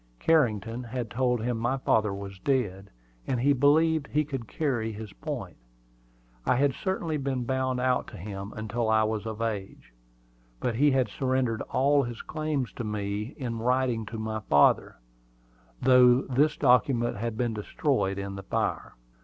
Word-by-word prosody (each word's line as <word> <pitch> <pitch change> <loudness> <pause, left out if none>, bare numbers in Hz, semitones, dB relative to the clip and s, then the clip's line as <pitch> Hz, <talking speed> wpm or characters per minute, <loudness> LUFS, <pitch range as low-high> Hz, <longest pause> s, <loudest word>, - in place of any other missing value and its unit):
Carrington 120 - +1
had 120 -1 -4
told 125 -2 0
him 120 -1 -1
my 120 +4 0
father 110 -5 +2
was 100 -1 -7
dead, 100 -7 -1 0.4
and 125 - 0
he 140 +4 +4
believed 150 +2 +3
he 150 +1 0
could 135 -6 -5
carry 125 -8 -1
his 105 -1 -8
point. - - -6 0.9
I - - +2
had 140 +1 +2
certainly 170 -2 -2
been 135 -3 -2
bound 130 0 -1
out 125 0 +1
to - - -10
him 100 +2 -6
until 110 +1 -2
I 110 0 +4
was 110 0 -2
of 110 0 -4
age; 100 - -5 0.7
but 120 - -1
he 145 +6 +4
had 130 -2 +2
surrendered 130 -4 -1
all 140 +2 +3
his 120 -3 -5
claims 155 -5 -2
to 120 - -3
me 105 +3 -3
in 120 -4 -4
writing 125 -2 0
to 115 - -6
my 110 0 -3
father, 75 0 +4 0.8
though 125 0 +6
this 145 +4 +1
document 125 -3 +3
had 115 +1 -3
been 120 -1 0
destroyed 105 -2 -1
in 100 0 -4
the - - -5
fire. 95 - -2
120 Hz, 160 wpm, -27 LUFS, 110-135 Hz, 0.9 s, though